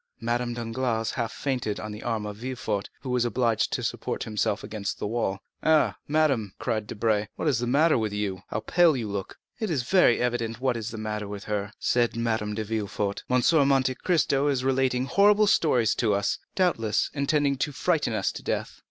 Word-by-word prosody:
Madame 120 0 -1
Danglars 115 -1 -1
half 115 -3 -2
fainted 125 -7 -2
on 105 - -6
the 105 +1 -8
arm 115 -3 -2
of 105 -1 -6
Villefort, 110 -4 -3
who 130 - -4
was 125 -1 +2
obliged 120 -1 +1
to - - -2
support - - -3
himself 105 -1 -1
against 100 -3 -4
the - - -4
wall. 105 -3 -1 0.2
"Ah, 160 -1 +3
madame," 140 -10 +1
cried 110 -4 -2
Debray, 105 0 0
"what - - -3
is 135 -6 +2
the 120 - -2
matter 150 +2 +4
with 110 -2 -1
you? 100 -2 -3
how 105 - -2
pale 170 -1 +4
you 115 -3 -3
look!" 100 -1 -5 0.2
"It 220 -3 -2
is 140 -7 0
very 180 -5 +4
evident 120 -2 -1
what 130 -1 +1
is 115 -1 -4
the 115 - -7
matter 105 -1 -3
with 100 0 -7
her," 105 -1 -3
said 120 -2 +1
Madame 110 -3 -1
de 110 - -2
Villefort; 105 -2 -2
"M. 125 0 +3
de 155 +3 +4
Monte 135 -2 +3
Cristo 145 -3 +1
is 135 -3 +1
relating 130 -1 +1
horrible 205 +7 +5
stories 125 - +3
to 110 -4 +1
us, 100 0 0 0.2
doubtless 115 - +1
intending 140 0 +1
to 145 +2 -1
frighten 150 -2 0
us - - 0
to - - -8
death." - - -3
120 Hz, 200 wpm, -26 LUFS, 105-135 Hz, 0.2 s, horrible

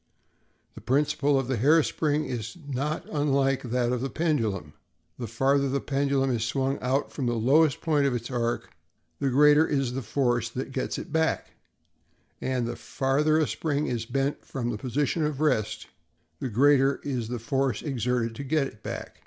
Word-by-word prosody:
The - - -11
principle 145 +1 +2
of 135 - -3
the 130 -2 0
hair 150 +8 +5
spring 150 0 0
is 115 +2 -5
not 145 +3 -2
unlike 140 -3 +1
that 125 0 0
of 125 -1 -1
the 135 - -2
pendulum: 110 - -1 0.5
the 120 - -4
farther 135 +4 +2
the 140 +1 0
pendulum 135 -1 0
is 115 -3 0
swung 135 +4 -1
out 130 +3 0
from 135 -4 -3
the 120 - 0
lowest 140 +6 +3
point 150 -4 +2
of 130 - 0
its 120 +1 -5
arc, 120 -1 -2 0.5
the 140 - +1
greater 150 +4 +5
is 135 -4 0
the 135 - -2
force 120 -1 0
that 130 +3 -5
gets 130 - -2
it - - -7
back; 160 0 0 0.9
and 130 -2 -1
the - - -4
farther 145 +4 +1
a 160 - +3
spring 150 -2 -1
is 115 -2 -3
bent 135 +3 -1
from 120 -3 -3
its 105 - -6
position 145 +5 0
of 150 -2 -1
rest, 110 -8 0 0.5
the 130 - -3
greater 135 +3 +4
is 125 -5 -2
the 120 +1 -3
force 130 0 -1
exerted 125 -4 -1
to 125 - -6
get 145 +1 +1
it 110 -5 -10
back. - - -6
135 Hz, 180 wpm, -27 LUFS, 120-145 Hz, 0.9 s, hair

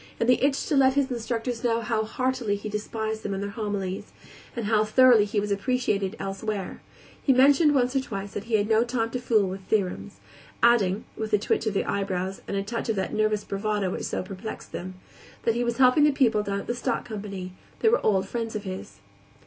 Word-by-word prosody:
In - - +2
the 250 +1 +3
itch 275 0 +2
to 300 - 0
let 265 -1 +4
his 280 -1 +1
instructors 235 0 -3
know 230 -1 +1
how 225 -1 0
heartily 255 -2 -1
he 205 +1 -6
despised 220 +1 -3
them 200 -1 -3
and 195 - -3
their 200 - -4
homilies, 200 -3 -4 0.4
and 235 -3 -3
how 215 0 +3
thoroughly 235 0 +6
he 210 0 -1
was 205 0 -2
appreciated 200 -2 0
elsewhere, 195 0 -4 0.4
he 275 - +3
mentioned 285 +3 +5
once 250 0 +2
or - - +4
twice 200 -6 -5
that 205 - -5
he 230 -1 +1
had 205 -1 +2
no 220 +1 +4
time 235 -2 -1
to 250 - -2
fool 220 -5 +2
with 190 +1 -5
theorems; 180 - -1 0.4
adding 220 -4 +4
with 220 0 -4
a - - +7
twitch 215 +2 0
of 210 - -1
the - - +1
eyebrows 190 -1 -2
and 200 - -2
a 195 - -1
touch 230 +3 -4
of 225 - +1
that 190 -1 -2
nervous 215 -1 +1
bravado 205 -1 -1
which - - -4
so - - -2
perplexed 195 +3 -8
them 185 +1 -6 0.5
that 230 - +2
he 240 +1 0
was 235 -1 -1
helping 260 +3 +5
the 300 - +6
people 240 -6 +3
down 200 -1 -2
at - - -11
the - - -1
stock 240 - -2
company; 200 -4 -6 0.3
they 445 - +5
were 480 - +2
old 195 -2 +2
friends 225 0 -4
of 210 - -3
his. 185 - -7
215 Hz, 220 wpm, -26 LUFS, 200-240 Hz, 0.5 s, a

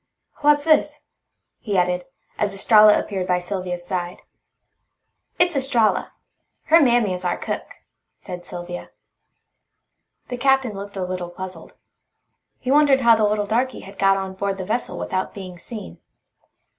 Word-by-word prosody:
What's 290 0 +3
this?" 300 -1 +2 0.5
he 205 -4 -2
added, 180 0 +1 0.3
as 205 -1 0
Estralla 210 +1 +6
appeared 190 -3 -4
by 180 - +2
Sylvia's 180 -1 -4
side. 175 -1 -4 1.1
"It's 350 -2 +2
Estralla. 240 -8 +1 0.5
Her 330 +1 +5
mammy 240 -7 +3
is 180 0 -5
our 175 -1 0
cook," - - -4 0.5
said 180 -1 -8
Sylvia. 175 0 -7 1.4
The 245 - -4
Captain 265 -2 +2
looked 200 0 -8
a 185 - -2
little 180 -1 -4
puzzled. 180 -1 -9 0.8
He 255 - -3
wondered 285 -2 +5
how 235 -2 +6
the 220 -1 +2
little 210 0 0
darky 240 +4 -1
had 195 +1 -13
got 195 0 +4
on 190 -1 -4
board 195 0 -2
the 190 - -5
vessel 235 +5 -2
without 185 0 -3
being 185 -3 -8
seen. 220 +3 -9
200 Hz, 145 wpm, -22 LUFS, 185-245 Hz, 1.4 s, Estralla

